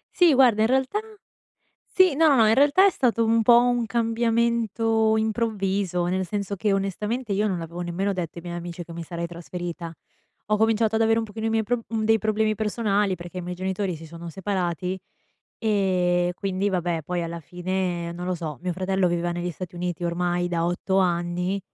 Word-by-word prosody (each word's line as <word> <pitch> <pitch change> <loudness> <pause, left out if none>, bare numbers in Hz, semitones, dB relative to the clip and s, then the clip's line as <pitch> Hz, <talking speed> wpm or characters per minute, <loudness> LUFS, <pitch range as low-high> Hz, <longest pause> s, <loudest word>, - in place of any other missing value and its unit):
Sì, 345 -5 +6
guarda, 245 -5 +5
in 220 - +4
realtà 265 - +1 1.0
sì 370 -6 +5
no, 320 +2 +4
no, 280 - +5
no, 220 -2 +5
in 220 - +5
realtà 290 +8 +5
è - - +5
stato 230 - +1
un 225 0 +3
po' 235 +1 +7
un 245 -1 +1
cambiamento 230 -1 +1
improvviso, 200 -5 0
nel 185 +1 -1
senso 200 +1 -3
che 205 +1 0
onestamente 210 +4 -2
io 210 +2 +1
non 185 -4 -1
l'avevo 170 +1 -7
nemmeno 190 +4 -1
detto 175 -2 -4
ai - - -9
miei 175 0 -5
amici 175 0 -6
che 170 - -10
mi 170 0 -6
sarei 170 +1 -4
trasferita. 170 0 -6 0.5
Ho 210 0 +2
cominciato 220 0 +2
ad 225 - +3
avere 225 0 +3
un 225 - -1
pochino 220 +1 -5
i - - +1
miei 225 0 +2
prob 230 +2 -1
dei 225 0 +2
problemi 215 +1 +1
personali 210 -3 0
perché 175 +1 -8
i - - -4
miei 180 +1 -5
genitori 190 0 -2
si 160 +1 -10
sono 170 +1 -9
separati, 185 -1 -2 0.6
e 180 -5 +1
quindi, 195 +1 -1
vabbè, 175 -3 -1
poi 175 0 -2
alla 170 0 -4
fine, 180 +1 -3
non 175 +1 -6
lo 185 - 0
so. 155 -6 -5
Mio 180 -1 -1
fratello 190 +1 0
viveva 175 0 -1
negli 175 +1 -3
Stati 180 +2 -8
Uniti 175 -1 -3
ormai 175 +1 0
da 170 -1 0
8 190 +2 0
anni. 180 +1 0
190 Hz, 195 wpm, -24 LUFS, 175-225 Hz, 1.0 s, po